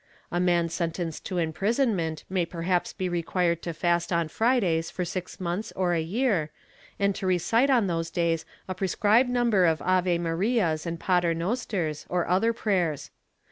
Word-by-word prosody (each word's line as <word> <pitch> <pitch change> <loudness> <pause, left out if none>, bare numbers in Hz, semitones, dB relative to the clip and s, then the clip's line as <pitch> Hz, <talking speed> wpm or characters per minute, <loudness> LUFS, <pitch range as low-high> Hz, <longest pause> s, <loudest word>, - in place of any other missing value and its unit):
A 175 - 0
man 175 -1 +2
sentenced 165 -1 -3
to 185 - -3
imprisonment 175 - 0
may 185 -1 0
perhaps 175 +1 -1
be 185 - -3
required 170 0 0
to 170 - -4
fast 170 +1 0
on 170 -2 +1
Fridays 195 -9 +1
for 180 - -3
six 180 +1 -5
months 180 +3 -3
or 180 -2 +1
a 165 - +1
year, 190 - 0 0.5
and 200 0 +2
to 190 0 -4
recite 225 +9 +2
on 245 -6 +4
those 165 -2 -2
days 165 -2 0 0.2
a 185 - -2
prescribed 210 +6 +2
number 235 -7 +3
of 160 -1 +2
Ave 180 -1 +2
Marias 170 0 0
and 170 0 -4
Paternosters 175 - -1
or 180 -1 0
other 190 +6 +3
prayers. 185 - -1
180 Hz, 160 wpm, -26 LUFS, 165-200 Hz, 0.5 s, on